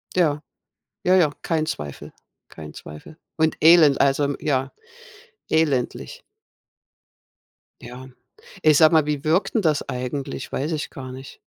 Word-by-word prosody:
Ja, 150 -5 +1 0.6
ja, 185 +1 +3
ja. 160 -6 +3
Kein 160 -2 -1
Zweifel. 75 - -7 0.4
Kein 75 -2 -11
Zweifel. 75 - -12 0.2
Und 160 0 +1
Elend. 160 -4 +6
Also, 140 +1 +2
m 140 0 -1
ja, 135 -2 -1 0.8
elendig. 150 -6 -1 1.6
Ja. 125 +2 -11 0.5
Ey, 155 - +5
sag 155 +1 +6
mal, 160 -2 +4
wie 150 -2 -3
wirkt 165 +9 0
denn 225 - +2
das 155 -3 0
eigentlich? 130 +1 -5
Weiß 150 +5 -3
ich 155 -2 -3
gar 130 -2 -9
nicht. 135 +1 -11
145 Hz, 135 wpm, -22 LUFS, 130-160 Hz, 1.6 s, Elend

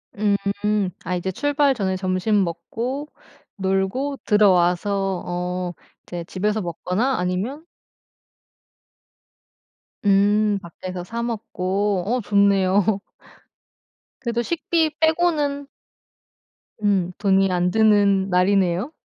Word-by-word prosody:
음. 200 -1 0
아 180 - -2
이제 185 +2 -2
출발 290 - +2
전에 190 -4 -1
점심 185 +2 +1
먹고 230 - -4 0.5
놀고 195 +9 -1
들어와서 195 -1 +2
어 180 0 -3 0.3
이제 175 -1 -6
집에서 210 +5 -1
먹거나 185 +9 -1
아니면 200 - -3 2.4
음. 205 +1 +3
밖에서 180 +1 -7
사 230 +6 -4
먹고. 205 -4 -1
어 245 +4 0
좋네요. 200 0 +3 1.2
그래도 235 -2 -1
식비 325 +2 0
빼고는 315 -4 +1 1.2
음 190 -3 +2
돈이 195 -1 +2
안 180 0 +1
드는 205 -3 +3
날이네요. 185 - +2
200 Hz, 185 characters per minute, -22 LUFS, 185-230 Hz, 2.4 s, 음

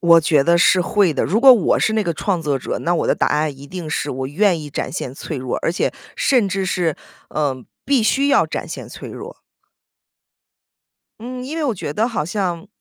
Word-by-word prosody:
我 170 -1 +6
觉 155 -3 +3
得 170 0 +4
是 180 +1 +5
会 190 -5 +2
的， - - 0
如 215 +5 +1
果 265 0 +9
我 235 - +2
是 220 - +1
那 220 - +2
个 170 -4 -1
创 175 0 -2
作 145 -3 0
者， - - -4
那 175 +1 0
我 - - 0
的 - - +3
答 - - +1
案 150 -1 0
一 140 +1 -12
定 175 +1 -7
是 150 -1 -2
我 130 0 -3
愿 175 +3 +1
意 150 - -7
展 - - -4
现 130 - -5
脆 155 - -6
弱， 125 -1 -3
而 165 - +1
且 - - -1 0.2
甚 245 -7 +3
至 190 0 -2
是， 170 -3 0 0.4
呃， 135 -4 -2 0.2
必 270 -3 +3
须 275 +6 +2
要 280 - +4
展 - - -5
现 - - -7
脆 - - -9
弱。 - - -9 1.8
嗯， 250 +2 -6
因 300 +5 -5
为 325 - -2
我 260 - +1
觉 160 -6 -5
得 225 +8 0
好 210 -10 -2
像， 180 0 -3
175 Hz, 240 characters per minute, -20 LUFS, 150-215 Hz, 1.8 s, 果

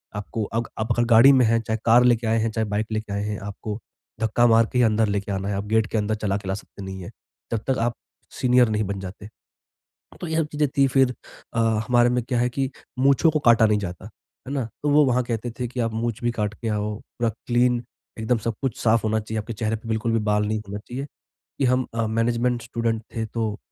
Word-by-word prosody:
आपको 105 +2 -3
अग 115 +3 -2
आप 110 +2 -1
अगर 120 - +2
गाड़ी 120 +3 +7
में 130 -2 +5
है 115 +1 +3
चाहे 110 0 -2
कार 120 +2 +6
लेके 120 -2 +3
आए 110 +1 +2
हैं, 115 +1 +1
चाहे 110 0 -1
बाइक 105 +1 -1
लेके 110 -2 -3
आए 100 +1 -1
हैं, 105 -1 -3
आपको 105 +2 -6 0.4
धक्का 110 +2 +3
मार 115 0 +5
के - - +1
ही - - +5
अंदर 110 0 +2
लेके 100 0 -2
आना 95 0 -2
है, 100 - -1
आप 100 +1 -3
गेट 110 0 +2
के 110 - -2
अंदर 105 0 0
चला 105 -2 -1
के 100 - -9
ला - - +1
सकते 100 -1 -11
नहीं 95 0 -6
है, - - -7 0.4
जब 115 -2 -1
तक 130 - +2
आप 120 0 0 0.4
सीनियर 125 -1 +4
नहीं 110 0 0
बन 100 0 -3
जाते। 95 +2 -8 0.9
तो - - -4
ये 160 - -1
सब 160 -2 +1
चीज़ें 150 -1 +1
थी 140 - +6
फिर 130 -1 +3 0.4
अ, 115 - +1 0.3
हमारे 120 -1 +4
में 125 0 +1
क्या 125 0 -1
है 125 - +2
कि 135 +1 -2 0.3
मूँछों 140 +4 +4
को 155 - +1
काटा 115 -3 +5
नहीं 105 -1 +2
जाता, 90 -1 -6 0.4
है - - -4
ना? 135 -3 -1 0.2
तो 145 - +1
वो 150 +1 +6
वहाँ 125 -1 +2
कहते 120 0 -3
थे 125 - -1
कि 125 +1 -4
आप 115 -1 0
मुँछ 115 0 -2
भी 120 - +3
काट 105 -2 -2
के 115 - -5
आओ, 105 0 -1
पूरा 115 0 -3 0.2
क्लीन 120 0 +2 0.4
एकदम 115 +2 +1
सब 115 - -1
कुछ 130 -4 -2
साफ 115 0 +3
होना 110 0 +1
चाहिए, 110 +1 -4
आपके 110 +2 -6
चेहरे 110 0 -1
पे 110 +1 -11
बिल्कुल 110 +1 0
भी 115 - +3
बाल 105 0 +2
नहीं 110 +1 -1
होना 100 +1 -4
चाहिए। 125 +6 -6 0.5
कि 140 - +1
हम 125 0 +2
अ, 115 -1 0
मैनेजमेंट 120 +2 0
स्टूडेंट 115 -1 -2
थे। 115 - -1
तो 110 -1 -3
115 Hz, 250 wpm, -24 LUFS, 105-120 Hz, 0.9 s, गाड़ी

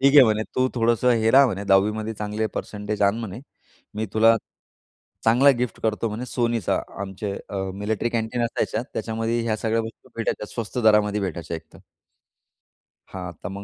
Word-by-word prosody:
ठीक 140 +1 +5
आहे 140 - +10
म्हणे. 110 -1 +2
तू 130 0 +3
थोडंसं 120 +1 +2
हे 110 0 +3
राह 135 +2 +7
म्हणे 100 -3 -3
10मध्ये 105 +3 +2
चांगले 105 +1 -2
पर्सेंटेज 105 0 -3
आण 100 +3 +3
म्हणे. 110 0 -6 0.5
मी 110 +1 -2
तुला 115 +1 +6 0.9
चांगला 125 +5 +6
गिफ्ट 125 -1 -2
करतो 110 +1 0
म्हणे 115 +4 -4
Sonyचा. 115 -5 +1 0.2
आमचे 100 +1 -4 0.2
अ, 100 - -4 0.2
मिलिटरी 105 +3 -1
कॅन्टीन 115 +1 -1
असायच्या. 115 -1 -1
त्याच्यामध्ये 115 +1 -1
ह्या 115 -2 0
सगळ्या 110 +1 0
वस्तू 115 +3 -10
भेटायच्या. 115 -2 -2
स्वस्त 115 +1 -4
दरामध्ये 105 -1 +4
भेटायच्या 85 -3 -3
एकतर. 80 0 -15 1.3
हां. 90 -2 -5
तर 90 - -3
मग 100 +1 -7
110 Hz, 165 wpm, -24 LUFS, 105-115 Hz, 1.3 s, आहे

